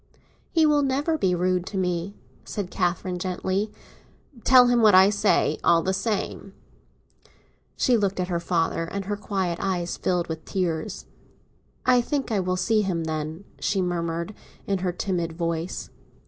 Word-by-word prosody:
"He 325 -2 +4
will 300 -1 +4
never 285 +4 +1
be 190 - +1
rude 180 0 +1
to 200 - -4
me," 180 +1 -1 0.3
said 200 -3 -5
Catherine 180 0 -1
gently. 190 +3 -2 0.7
"Tell 255 -1 +7
him 245 -1 +3
what 210 -3 +6
I 190 +2 +7
say, 210 0 +2
all 165 -1 +4
the 190 - 0
same." 195 -1 -3 1.2
She 250 - +3
looked 200 -4 0
at 180 - 0
her 175 -2 -1
father, 165 -1 0
and 195 +3 -5
her 205 +1 -2
quiet 190 -4 -2
eyes 180 -3 -1
filled 180 -2 0
with 160 -1 -5
tears. 170 -4 -3 0.8
"I 250 -1 +5
think 275 0 -2
I 210 - +2
will 185 0 -1
see 220 +3 +2
him, 180 -5 -1
then," 160 +2 -4 0.2
she 200 - 0
murmured, 170 +1 -2 0.3
in 195 -1 0
her 180 0 -1
timid 175 -2 -2
voice. 170 +1 -3
185 Hz, 160 wpm, -25 LUFS, 175-205 Hz, 1.2 s, Tell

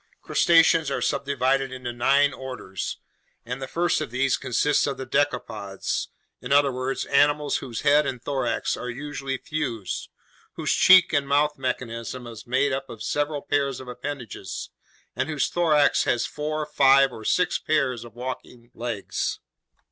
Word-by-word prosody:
Crustaceans 165 -2 +4
are 135 - -1
subdivided 135 0 0
into 125 -2 -5
nine 140 +4 +3
orders, 125 -9 -6 0.5
and 125 +3 -5
the 135 - -4
first 170 +2 0
of 155 - -3
these 130 +2 +1
consists 140 +3 +1
of 140 - -2
the 130 - -5
decapods, 110 -9 -2 0.3
in 125 - -7
other 140 0 +5
words, 130 +1 -3
animals 145 +1 +2
whose 120 -4 -6
head 145 0 +4
and 125 - -3
thorax 125 -2 -1
are 125 - -6
usually 135 +1 -4
fused, 130 - -4 0.4
whose - - -1
cheek 185 -2 +6
and 140 -2 +1
mouth 145 +1 +2
mechanism 125 -2 -4
is 115 -1 -10
made 130 +3 +1
up 135 0 -4
of 110 -1 -8
several 145 +2 -1
pairs 140 -2 0
of 130 - -10
appendages, 125 -1 -6 0.4
and 145 - -2
whose 150 -3 0
thorax 155 -4 +3
has 120 - +1
four, 150 +1 -3
five, 135 -2 +5
or 110 - -9
six 180 +11 +1
pairs 135 -6 0
of 120 -2 -13
walking 125 -1 -7
legs. 115 -4 -3
135 Hz, 155 wpm, -25 LUFS, 125-145 Hz, 0.5 s, cheek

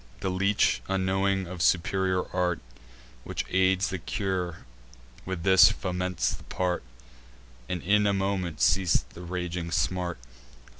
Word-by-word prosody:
The 95 - -1
leech, 100 +3 +2
unknowing 95 0 +1
of 90 0 -7
superior 95 +1 +2
art 90 -2 +1 0.6
Which - - -4
aids 95 0 +3
the 95 - -3
cure, 90 -1 -3 0.6
with 95 -3 -4
this 95 0 +7
foments 90 -2 -2
the - - -9
part; 90 -1 -1 0.9
And 90 -2 -3
in 105 +2 +3
a - - +3
moment 95 -6 -2
ceas'd 85 +6 +2
the 85 - -11
raging 90 -1 -4
smart. 90 0 -1
90 Hz, 130 wpm, -27 LUFS, 90-95 Hz, 0.9 s, this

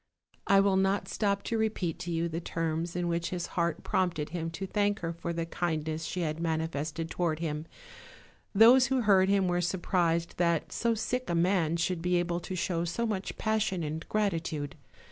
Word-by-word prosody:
I 195 0 +6
will 195 -1 +3
not 195 +1 +2
not - - -16
stop 200 +1 0
to 230 - -1
repeat 210 -7 -1
to 175 - -4
you 165 0 0
the 165 +1 -4
terms 165 0 -2
in 175 -1 -1
which 170 0 -1
his 180 -2 -3
heart 170 -2 0
prompted 170 -5 0
him 165 0 -3
to 180 +4 -5
thank 205 +1 0
her 165 -1 -2
for 170 +1 -4
the 165 0 -2
kindness 160 -2 -2
she 180 - -3
had 155 -1 -2
manifested 160 -1 -2
toward 170 -3 0
him; 155 -1 -3 0.9
those 245 +5 +7
who 265 0 +1
heard 195 -3 +4
him 195 -2 +3
were 175 0 +1
surprised 170 -1 0
that 170 -2 +1
so 235 -1 +1
sick 250 +2 -2
a 170 - +1
man 170 -2 +2
should 170 0 -1
be 180 +1 +1
able 175 0 0
to 185 +2 -6
show 170 -1 -1
so 175 +8 -1
much 205 -4 -3
passion 220 -5 0
and 155 +1 -5
gratitude. 165 -8 -1
175 Hz, 195 wpm, -30 LUFS, 165-195 Hz, 0.9 s, those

